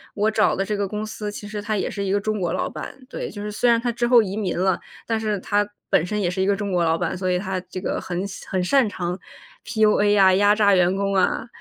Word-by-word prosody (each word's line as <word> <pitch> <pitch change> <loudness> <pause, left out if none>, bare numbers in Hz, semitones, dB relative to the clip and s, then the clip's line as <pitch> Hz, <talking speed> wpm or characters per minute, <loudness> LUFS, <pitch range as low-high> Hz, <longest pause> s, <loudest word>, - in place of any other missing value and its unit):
我 215 +1 +1
找 215 -1 +2
的 195 - -1
这 210 +1 -2
个 200 -1 -1
公 210 +2 -4
司 215 -1 -5
其 205 0 -8
实 210 0 -5
他 215 0 -2
也 - - -1
是 200 - -4
一 195 - -1
个 205 - +2
中 215 +1 -2
国 175 -2 -1
老 - - -1
板。 - - -8
对， - - -5
就 205 - -8
是 210 - -4
虽 240 +4 +1
然 230 -1 +4
他 240 +1 -1
之 240 +1 -1
后 240 -2 +7
移 195 0 -4
民 205 -5 -2
了， 185 0 +1 0.3
但 225 -1 -1
是 215 -2 -1
他 205 +2 0 0.2
本 - - +3
身 210 +3 -2
也 175 - +1
是 185 +2 -2
一 190 - +2
个 200 - +3
中 200 -1 -4
国 175 -1 +2
老 165 0 +2
板， - - -2
所 185 0 -2
以 180 - +2
他 190 0 -3
这 185 - -8
个 185 - -2
很 180 +1 -3
擅 195 - -10
很 185 -1 0
擅 260 +5 +3
长 180 -1 -4 0.5
PUA 215 -1 +3
呀， 190 -2 +6
压 205 +1 +4
榨 205 -2 +4
员 180 +1 +3
工 200 0 -1
啊。 190 +5 +1
205 Hz, 315 characters per minute, -23 LUFS, 190-215 Hz, 0.5 s, 后